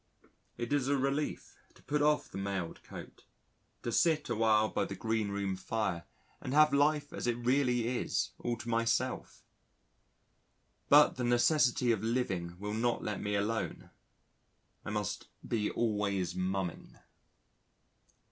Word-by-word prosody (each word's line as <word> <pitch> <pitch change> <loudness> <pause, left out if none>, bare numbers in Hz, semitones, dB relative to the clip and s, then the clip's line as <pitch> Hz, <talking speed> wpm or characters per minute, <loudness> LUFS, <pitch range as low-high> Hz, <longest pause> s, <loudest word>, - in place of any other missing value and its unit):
It 120 +3 -3
is 140 -3 +1
a 140 0 +2
relief 140 +3 -2 0.2
to - - -21
put 150 +1 0
off 150 0 +2
the - - -5
mailed 95 -3 -3
coat, - - -11 0.6
to 120 - -2
sit 155 +3 +2
awhile 110 -1 +3
by - - -1
the 100 - -6
green 110 +1 -1
room 100 -1 -2
fire 95 -2 -2 0.4
and 130 - -3
have 150 -1 +6
life 145 0 +2
as - - -4
it 120 - +2
really 125 -1 +1
is, 125 0 -1
all 120 -1 -2
to 120 - -9
myself. 115 +2 -1 1.5
But 145 -1 +6
the 125 - -2
necessity 120 0 +3
of 110 - 0
living 95 -8 -1
will 105 +2 -4
not 120 +2 0
let 105 -2 -3
me 105 0 -1
alone. 110 +3 -2 0.9
I - - -6
must 105 -2 -3 0.2
be 105 -3 0
always 100 -5 -1
mumming. 90 -1 -3
115 Hz, 140 wpm, -32 LUFS, 100-130 Hz, 1.5 s, have